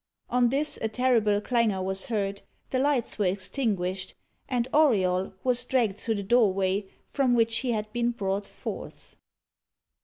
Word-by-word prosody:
On 245 -1 +3
this, 290 +4 -1
a 220 - +1
terrible 220 -3 +2
clangour 215 -4 +1
was 190 0 -1
heard; 200 -3 -2 0.3
the 255 - +1
lights 270 -5 0
were 200 - +2
extinguished; 190 -1 -2 0.3
and 245 -1 0
Auriol 190 -12 +3
was 250 -1 +3
dragged 230 -7 0
through 225 - -1
the 200 - -3
doorway 195 -3 +2 0.2
from 260 -3 +1
which 230 -1 +2
he 255 +1 -2
had 215 -1 -4
been 240 0 +1
brought 200 -3 -2
forth. - - -8
220 Hz, 150 wpm, -27 LUFS, 195-245 Hz, 0.3 s, On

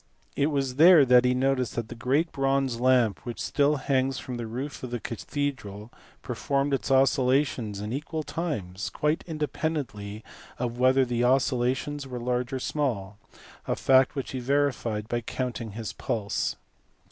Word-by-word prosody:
It 140 - +2
was 135 -4 -1
there 165 -2 +8
that 125 0 +6
he 125 0 +3
noticed 130 -2 0
that 115 -2 -3
the - - -6
great 135 +8 0
bronze 135 -3 0
lamp, 125 -5 +3
which 120 -2 -6
still 145 +1 +2
hangs 135 -1 0
from 125 -2 -5
the 120 -1 -4
roof 130 +5 -5
of 125 - -5
the 120 0 -3
cathedral, 115 -4 -4 0.3
performed 140 0 -1
its 135 - -1
oscillations 130 -4 +2
in 105 +2 -4
equal 155 +3 -3
times, 105 - -4
quite 150 +2 0
independently 145 -9 -3 0.3
of 120 0 -3
whether 130 +1 +4
the 120 -1 -1
oscillations 130 +2 +1
were 125 -2 -5
large 125 0 -1
or 135 - -1
small 115 -8 -2 0.5
a - - +1
fact 130 +1 +4
which 135 - -4
he 130 - -3
verified 125 -5 0
by 120 +1 -1
counting 115 -2 -4
his 110 0 -5
pulse. 105 -3 -2
130 Hz, 160 wpm, -27 LUFS, 120-140 Hz, 0.5 s, there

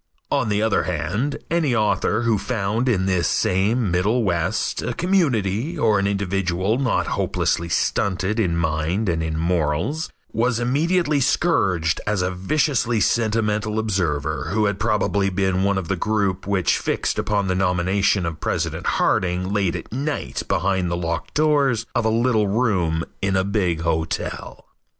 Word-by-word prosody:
On 110 - +1
the 105 +1 +1
other 110 -1 +1
hand, 125 +11 -2
any 160 -7 +1
author 110 +1 +1
who 115 -3 +2
found 115 +2 -1
in 95 -6 +1
this 95 -2 +1
same 100 +3 +1
middle 105 +7 +1
west 90 +1 -1
a - - -3
community 150 - 0
or 110 -7 +3
an 100 - +1
individual 100 +1 0
not 130 -3 +1
hopelessly 85 0 -1
stunted 100 +5 0
in 85 -6 +1
mind 80 +6 -1
and 85 -2 0
in 80 -1 -2
morals, 85 - -1 0.2
was 115 +1 +1
immediately 150 +5 +1
scourged 100 - +1
as 105 -4 +1
a 90 - -1
viciously 120 - 0
sentimental 110 -1 0
observer 95 -10 -1
who 105 +2 +1
had 100 -1 -1
probably 100 -3 +1
been 95 0 0
one 100 0 +1
of 95 -4 -3
the 95 - 0
group 100 -1 -1
which 95 -3 +1
fixed - - -1
upon 100 -2 0
the 95 - +1
nomination 95 +1 +1
of 80 -2 -4
President - - -2
Harding 90 +2 +1
late 100 -4 +1
at - - -7
night 145 +3 -3
behind 95 -1 0
the 85 - -1
locked 85 -1 -4
doors 140 -6 +2
of - - 0
a - - +3
little 115 -2 +2
room 95 -7 +1 0.2
in 100 -1 0
a 95 - +2
big 95 -5 0
hotel. 80 -1 -3
100 Hz, 155 wpm, -22 LUFS, 90-115 Hz, 0.2 s, or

